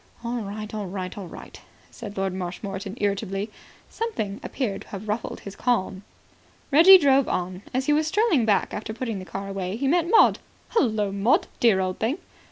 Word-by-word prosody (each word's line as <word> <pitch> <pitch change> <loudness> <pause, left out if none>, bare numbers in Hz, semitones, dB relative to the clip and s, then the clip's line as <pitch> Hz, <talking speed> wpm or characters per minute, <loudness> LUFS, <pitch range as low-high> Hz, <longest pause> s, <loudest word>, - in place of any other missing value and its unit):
"All 240 +1 -2
right. 210 +1 -6
All 210 -2 -3
right. 185 -1 -5
All 195 -3 -7
right," - - -11 0.3
said 210 -4 -9
Lord 190 -1 -1
Marshmoreton 195 +3 -5
irritably. 200 0 -1 0.4
Something 220 - -3
appeared 210 -8 -3
to - - -13
have 205 +1 -8
ruffled 215 +2 -3
his 200 -1 -9
calm. 195 -6 0 0.7
Reggie 340 +7 +10
drove 275 -5 +4
on. 180 +1 -2
As 260 +1 -1
he 295 - +3
was 305 +1 +2
strolling 400 - +2
back 210 -3 +1
after 220 +1 -5
putting 230 -5 -3
the 185 - -8
car 195 +1 -6
away 195 -1 -3
he 270 +4 -1
met 340 +3 +2
Maud. 450 - +6 0.3
"Hullo, 215 - +1
Maud, 200 +6 +2
dear 225 -5 +4
old 185 -1 -2
thing." 240 +8 0
210 Hz, 180 wpm, -25 LUFS, 195-255 Hz, 0.7 s, Reggie